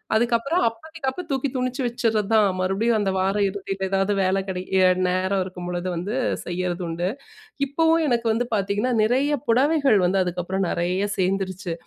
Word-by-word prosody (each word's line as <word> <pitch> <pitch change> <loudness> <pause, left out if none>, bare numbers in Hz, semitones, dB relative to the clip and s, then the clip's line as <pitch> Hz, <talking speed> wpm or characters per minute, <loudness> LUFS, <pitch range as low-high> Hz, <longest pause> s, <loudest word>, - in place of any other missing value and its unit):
அதுக்கப்புறம் 240 +9 +1
அப்போதைக்கு, 285 +6 -6
அப்ப 360 +7 -6
தூக்கி 275 0 0
துணுச்சு 255 +1 -2
வச்சிர்றதான். 225 -3 +2
மறுபடியும் 200 +5 +1
அந்த 195 -2 0
வார 190 +1 +1
இறுதியில 195 0 -4
ஏதாவது 195 +1 +1
வேல 190 +1 +2
கிடைக்க 185 -1 -5
எ - - +6 0.2
நேரம் 185 +2 0
இருக்கும்பொழுது 180 -1 -5
வந்து 180 +6 -3 0.3
செய்யிறது 180 0 -3
உண்டு. 170 +2 -2 0.6
இப்பவும் 325 +4 +2
எனக்கு 235 -3 +1
வந்து 235 +2 0
பார்த்தீங்கன்னா, 205 +5 0
நிறைய 260 +6 +2 0.2
புடவைகள் 275 +1 +3
வந்து 190 +2 +2
அதுக்கப்பறம் 180 +2 -2
நெறைய 180 +4 0
சேர்ந்துருச்சு. 190 -1 -1
200 Hz, 145 wpm, -23 LUFS, 185-245 Hz, 0.6 s, எ